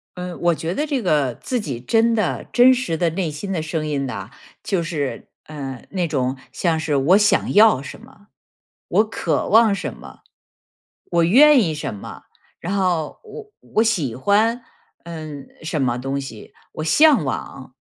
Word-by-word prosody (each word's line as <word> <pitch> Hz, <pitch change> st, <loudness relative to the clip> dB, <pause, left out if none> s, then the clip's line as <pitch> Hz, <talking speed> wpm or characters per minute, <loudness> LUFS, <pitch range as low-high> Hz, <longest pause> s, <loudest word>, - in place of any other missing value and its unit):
嗯， 180 Hz, -1 st, -6 dB
我 175 Hz, -1 st, +2 dB
觉 165 Hz, +2 st, -4 dB
得 300 Hz, -, -1 dB
这 285 Hz, -4 st, -1 dB
个 145 Hz, -, +1 dB
自 250 Hz, -, -3 dB
己 135 Hz, -, -5 dB
真 225 Hz, -, +2 dB
的 215 Hz, -, -1 dB
真 250 Hz, +1 st, +6 dB
实 245 Hz, -10 st, -2 dB
的 170 Hz, +1 st, +1 dB
内 170 Hz, -1 st, -2 dB
心 195 Hz, +7 st, -6 dB
的 165 Hz, -4 st, -2 dB
声 155 Hz, 0 st, -3 dB
音 145 Hz, -2 st, -2 dB
呐， 100 Hz, -4 st, -6 dB, 0.3 s
就 190 Hz, -4 st, 0 dB
是， 145 Hz, -8 st, -4 dB, 0.2 s
呃， 135 Hz, -5 st, -8 dB
那 180 Hz, -3 st, -1 dB
种 130 Hz, -3 st, -1 dB, 0.2 s
像 165 Hz, -3 st, 0 dB
是 155 Hz, -2 st, -1 dB
我 160 Hz, +9 st, +4 dB
想 205 Hz, -1 st, +2 dB
要 215 Hz, -9 st, +6 dB
什 140 Hz, -, -10 dB
么、 225 Hz, -3 st, -19 dB, 0.6 s
我 215 Hz, -, +3 dB
渴 -, -, -1 dB
望 220 Hz, -1 st, +5 dB
什 -, -, -5 dB
么、 -, -, -13 dB, 0.9 s
我 170 Hz, -1 st, +1 dB
愿 275 Hz, -, +6 dB
意 160 Hz, -4 st, -1 dB
什 150 Hz, -7 st, -5 dB
么， 100 Hz, -, -10 dB, 0.4 s
然 185 Hz, +4 st, -3 dB
后 175 Hz, -5 st, -1 dB
我 435 Hz, -1 st, -11 dB, 0.2 s
我 220 Hz, -, +5 dB
喜 165 Hz, -, 0 dB
欢， 215 Hz, -, +1 dB, 0.4 s
嗯， 155 Hz, -5 st, -8 dB, 0.2 s
什 155 Hz, -2 st, -2 dB
么 120 Hz, -2 st, 0 dB
东 135 Hz, +2 st, -3 dB
西， 115 Hz, -6 st, -10 dB, 0.2 s
我 155 Hz, -, -5 dB
向 275 Hz, -, +5 dB
往。 130 Hz, 0 st, -6 dB
170 Hz, 185 characters per minute, -21 LUFS, 140-215 Hz, 0.9 s, 真